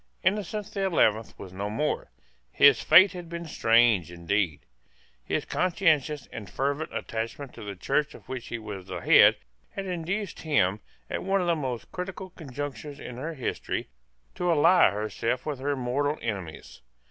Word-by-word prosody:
Innocent 205 Hz, +2 st, 0 dB
the 195 Hz, -, -2 dB
Eleventh 110 Hz, -, +2 dB
was 95 Hz, -2 st, -10 dB
no 100 Hz, +2 st, -3 dB
more. 150 Hz, +8 st, -2 dB, 0.4 s
His 140 Hz, -, +6 dB
fate 190 Hz, 0 st, +7 dB
had 175 Hz, -3 st, -8 dB
been 170 Hz, 0 st, -5 dB
strange 115 Hz, -, +3 dB
indeed. 85 Hz, -1 st, -1 dB, 0.6 s
His -, -, -2 dB
conscientious 160 Hz, -6 st, +1 dB
and 105 Hz, -4 st, -7 dB
fervent 140 Hz, +3 st, -2 dB
attachment 115 Hz, +4 st, -5 dB
to -, -, -10 dB
the 100 Hz, -1 st, -6 dB
Church 145 Hz, +10 st, -1 dB
of -, -, -15 dB
which 130 Hz, -2 st, -6 dB
he 120 Hz, -, -4 dB
was 105 Hz, -4 st, -8 dB
the 90 Hz, -3 st, -5 dB
head -, -, +7 dB, 0.3 s
had 195 Hz, -, -6 dB
induced 185 Hz, +3 st, -3 dB
him, 105 Hz, -, +2 dB, 0.3 s
at -, -, -3 dB
one 195 Hz, +1 st, +1 dB
of 180 Hz, -, 0 dB
the 170 Hz, -1 st, +2 dB
most 130 Hz, -6 st, -4 dB
critical 185 Hz, 0 st, -6 dB
conjunctures 145 Hz, -1 st, -7 dB
in 120 Hz, -, -8 dB
her 155 Hz, +5 st, -5 dB
history, 130 Hz, -, -3 dB, 0.4 s
to 180 Hz, 0 st, -1 dB
ally 170 Hz, +3 st, +6 dB
herself 110 Hz, +4 st, -2 dB
with 150 Hz, -4 st, -3 dB
her 145 Hz, +2 st, -1 dB
mortal 140 Hz, +4 st, -1 dB
enemies. 95 Hz, -, -6 dB
140 Hz, 160 wpm, -27 LUFS, 110-170 Hz, 0.6 s, fate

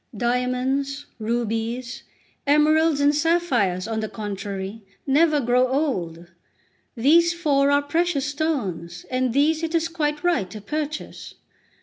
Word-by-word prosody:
Diamonds, 255 Hz, +4 st, -1 dB
rubies, 230 Hz, +2 st, -2 dB, 0.5 s
emeralds, 305 Hz, +1 st, +4 dB
and 285 Hz, +1 st, +4 dB
sapphires, 290 Hz, -, +1 dB
on 225 Hz, -1 st, -2 dB
the 215 Hz, -1 st, -3 dB
contrary, 200 Hz, 0 st, -5 dB, 0.2 s
never 300 Hz, +2 st, +3 dB
grow 250 Hz, 0 st, +2 dB
old; 190 Hz, -, -2 dB, 0.7 s
these 335 Hz, +8 st, +4 dB
four 280 Hz, -5 st, +2 dB
are 285 Hz, 0 st, +3 dB
precious 325 Hz, -1 st, 0 dB
stones, 225 Hz, -, -3 dB
and 255 Hz, -1 st, 0 dB
these 300 Hz, +5 st, +2 dB
it 330 Hz, 0 st, -2 dB
is 330 Hz, 0 st, +1 dB
quite 300 Hz, -3 st, -2 dB
right 340 Hz, -, +1 dB
to 215 Hz, -, -8 dB
purchase." 300 Hz, +7 st, -5 dB
275 Hz, 120 wpm, -23 LUFS, 225-305 Hz, 0.7 s, emeralds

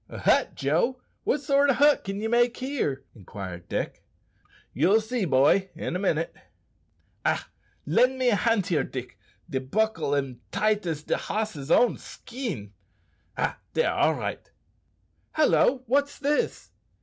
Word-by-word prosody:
"A -, -, -8 dB
hut, -, -, +2 dB
Joe! 170 Hz, -, 0 dB, 0.3 s
what 290 Hz, -, +1 dB
sort 280 Hz, 0 st, +3 dB
o' -, -, +5 dB
hut 290 Hz, +3 st, +4 dB
can 195 Hz, +1 st, -4 dB
ye 220 Hz, -, -2 dB
make 240 Hz, +1 st, +2 dB
here?" 255 Hz, -, -2 dB
inquired 95 Hz, -4 st, -9 dB
Dick. -, -, -3 dB, 0.7 s
"Ye'll 210 Hz, +4 st, +4 dB
see, 220 Hz, -1 st, -2 dB
boy, 150 Hz, +7 st, +3 dB
in 165 Hz, -, -4 dB
a -, -, -1 dB
minute." 165 Hz, -4 st, 0 dB, 0.9 s
"Ach! -, -, +1 dB, 0.4 s
lend 250 Hz, -, +3 dB
me 255 Hz, -1 st, +2 dB
a 225 Hz, -, +3 dB
hand 225 Hz, -3 st, +2 dB
here, 165 Hz, -8 st, +1 dB
Dick; 130 Hz, -1 st, -7 dB, 0.3 s
de 135 Hz, -6 st, -2 dB
bockle 195 Hz, +2 st, 0 dB
am 130 Hz, -3 st, -4 dB
tight 210 Hz, -2 st, +1 dB
as 155 Hz, -2 st, -3 dB
de -, -, 0 dB
hoss's 205 Hz, -10 st, -3 dB
own 245 Hz, -, +4 dB
skin. 210 Hz, -, -7 dB, 0.6 s
Ah! -, -, -1 dB, 0.2 s
dere 480 Hz, -, +2 dB
all -, -, +2 dB
right." -, -, -5 dB, 0.8 s
"Hallo! 275 Hz, -4 st, +3 dB
what's 285 Hz, +4 st, +1 dB
this?" 290 Hz, +1 st, -1 dB
215 Hz, 150 wpm, -26 LUFS, -, 0.9 s, o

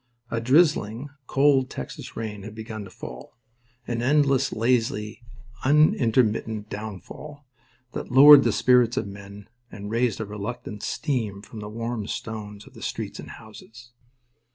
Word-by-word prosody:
A 115 Hz, -, -1 dB
drizzling, 135 Hz, -2 st, +2 dB, 0.2 s
cold 135 Hz, -1 st, +3 dB
Texas 65 Hz, -, -8 dB
rain 105 Hz, -2 st, -5 dB
had 105 Hz, +2 st, -9 dB
begun 110 Hz, -1 st, -7 dB
to -, -, -11 dB
fall—an 120 Hz, -, -9 dB
endless, 135 Hz, 0 st, +3 dB
lazy, 115 Hz, -2 st, 0 dB, 0.4 s
unintermittent 115 Hz, -6 st, +2 dB
downfall 110 Hz, +8 st, -8 dB, 0.5 s
that -, -, -6 dB
lowered 140 Hz, +2 st, +10 dB
the 115 Hz, -, +2 dB
spirits 120 Hz, +2 st, +3 dB
of -, -, 0 dB
men 100 Hz, 0 st, -10 dB, 0.2 s
and 105 Hz, 0 st, -7 dB
raised 115 Hz, -2 st, +1 dB
a 110 Hz, -, -3 dB
reluctant 105 Hz, +1 st, -6 dB
steam 110 Hz, -9 st, -2 dB
from 110 Hz, +2 st, -10 dB
the 105 Hz, 0 st, -7 dB
warm 115 Hz, -1 st, -4 dB
stones 105 Hz, -2 st, -6 dB
of -, -, -16 dB
the -, -, -13 dB
streets -, -, -5 dB
and -, -, -9 dB
houses. 120 Hz, +2 st, -13 dB
115 Hz, 135 wpm, -25 LUFS, 105-125 Hz, 0.5 s, lowered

